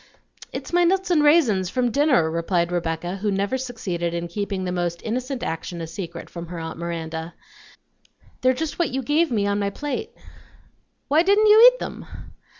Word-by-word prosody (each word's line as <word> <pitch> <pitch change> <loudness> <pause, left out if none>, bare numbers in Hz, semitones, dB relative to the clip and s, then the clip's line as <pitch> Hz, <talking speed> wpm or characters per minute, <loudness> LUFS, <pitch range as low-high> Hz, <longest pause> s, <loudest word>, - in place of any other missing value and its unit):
"It's - - -7
my 350 0 +4
nuts 375 +1 +1
and 320 -4 +4
raisins 265 - +4
from 245 +2 0
dinner," 255 - +3
replied 170 +1 0
Rebecca, 175 +1 -2
who 205 +2 -1
never 200 +4 0
succeeded 190 -10 -3
in 170 0 -3
keeping 200 +1 -3
the 180 - -2
most 175 -1 -2
innocent 255 +3 -3
action 165 +2 -4
a 165 - -4
secret 170 0 -7
from 170 -1 -8
her 175 +1 -7
aunt 160 0 -6
Miranda; 165 -1 -5 1.1
"they're 255 0 +4
just 315 +5 -4
what 345 - +2
you 265 +1 -3
gave 310 +6 +2
me 210 -4 +1
on 200 0 0
my 200 -1 0
plate." 295 - -4 1.0
"Why 300 +3 +4
didn't 400 +4 +4
you 435 +3 +9
eat - - -11
them?" - - -7
200 Hz, 180 wpm, -23 LUFS, -, 1.1 s, you